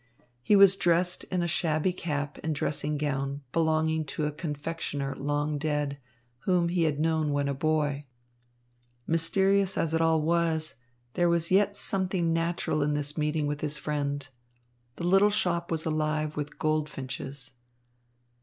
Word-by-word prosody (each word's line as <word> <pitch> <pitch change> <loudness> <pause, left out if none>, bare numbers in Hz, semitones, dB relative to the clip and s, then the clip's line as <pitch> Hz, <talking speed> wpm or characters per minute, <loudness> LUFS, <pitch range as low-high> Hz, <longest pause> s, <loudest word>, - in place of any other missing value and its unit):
He 205 - +3
was 195 -1 +8
dressed 175 +1 +1
in 180 -2 -1
a - - 0
shabby 165 +1 +1
cap 145 -4 -3
and 160 -1 -1
dressing 150 +1 -1
gown 140 -1 -2
belonging 160 -1 +1
to 150 +2 -3
a 150 - -1
confectioner 145 -2 -4
long 145 +1 -1
dead, 145 -2 -1 0.4
whom 175 +2 +1
he 170 -1 +1
had 150 -2 0
known 160 -1 +1
when 145 0 0
a 140 - 0
boy. 145 -1 0 1.0
Mysterious 190 +4 +2
as 160 -1 0
it 165 - +2
all 165 -1 +3
was, 160 -1 +1 0.4
there 175 -1 +2
was 170 0 +1
yet 200 +1 +4
something 185 -4 0
natural 165 -2 0
in 145 +1 +1
this 145 0 -2
meeting 150 0 0
with 145 0 -3
his 150 0 -2
friend. 145 -1 -2 0.7
The 170 - -4
little 195 +3 +5
shop 175 -5 0
was 160 -1 -1
alive 155 -1 -1
with 150 0 -5
goldfinches. 140 -4 -3
155 Hz, 150 wpm, -28 LUFS, 145-170 Hz, 1.0 s, was